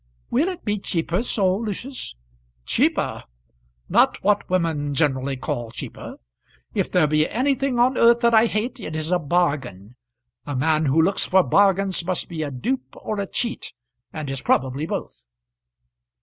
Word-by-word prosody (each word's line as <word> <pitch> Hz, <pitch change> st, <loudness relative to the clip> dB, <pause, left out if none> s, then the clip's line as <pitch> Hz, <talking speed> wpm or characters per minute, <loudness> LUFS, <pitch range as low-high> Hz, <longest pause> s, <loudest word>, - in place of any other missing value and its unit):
"Will 290 Hz, +8 st, +2 dB
it 365 Hz, -2 st, -5 dB
be 210 Hz, -1 st, 0 dB
cheaper 170 Hz, 0 st, -1 dB
so, 195 Hz, -6 st, +1 dB
Lucius?" 230 Hz, -, -5 dB, 0.5 s
"Cheaper! -, -, 0 dB, 0.6 s
not -, -, +3 dB
what 205 Hz, +1 st, +2 dB
women 160 Hz, -5 st, 0 dB
generally 135 Hz, -2 st, 0 dB
call 120 Hz, -2 st, -3 dB
cheaper. 115 Hz, -, -8 dB, 0.6 s
If -, -, -1 dB
there 180 Hz, -4 st, +4 dB
be 155 Hz, +1 st, +2 dB
anything 265 Hz, +1 st, 0 dB
on 250 Hz, +2 st, +3 dB
earth 235 Hz, 0 st, +5 dB
that 235 Hz, -1 st, +3 dB
I 225 Hz, +1 st, +6 dB
hate, 235 Hz, +5 st, -2 dB
it 155 Hz, -7 st, -6 dB
is 155 Hz, +2 st, -3 dB
a 180 Hz, -, +3 dB
bargain. 140 Hz, -, -1 dB, 0.5 s
A 145 Hz, -, -3 dB
man 155 Hz, +3 st, +2 dB
who 140 Hz, +4 st, +3 dB
looks 185 Hz, +5 st, +3 dB
for 190 Hz, 0 st, +4 dB
bargains 195 Hz, +3 st, +2 dB
must 180 Hz, +1 st, -2 dB
be 165 Hz, -2 st, -4 dB
a 150 Hz, -, -2 dB
dupe 250 Hz, -, -3 dB
or 215 Hz, -1 st, -4 dB
a 200 Hz, -, -2 dB
cheat, 235 Hz, -1 st, -3 dB, 0.4 s
and 155 Hz, -2 st, -5 dB
is 135 Hz, -, -4 dB
probably 135 Hz, +4 st, 0 dB
both." -, -, -6 dB
180 Hz, 160 wpm, -23 LUFS, 145-220 Hz, 0.6 s, I